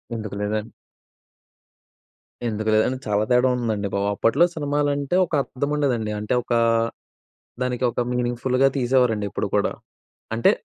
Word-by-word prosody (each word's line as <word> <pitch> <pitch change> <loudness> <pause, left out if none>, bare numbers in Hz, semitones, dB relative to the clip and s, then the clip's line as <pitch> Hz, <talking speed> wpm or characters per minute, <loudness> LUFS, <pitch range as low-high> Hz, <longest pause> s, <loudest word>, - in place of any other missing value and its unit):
ఎందుకు 105 -3 -5
లేదన్ 105 +2 -2 1.8
ఎందుకు 110 0 -2
లేదండి, 125 +4 +2
చాలా 105 0 +2
తేడా 125 +1 +5
ఉందండి 110 -4 -1
బాబు. 100 0 0
అప్పట్లో 140 +12 +4
సినిమాలంటే 145 0 0
ఒక 165 - -16
అర్థముండేదండి. 135 -6 -1
అంటే, 105 +3 -2
ఒకా 120 0 +1 1.0
దానికి 125 0 -1
ఒక - - -1
మీనింగ్‌ఫుల్లుగా 125 +2 +1
తీసేవారండి 120 -4 +2
ఎప్పుడు - - -2
కూడా. - - +2 0.6
అంటే 115 - +4
120 Hz, 120 wpm, -23 LUFS, 110-135 Hz, 1.8 s, తేడా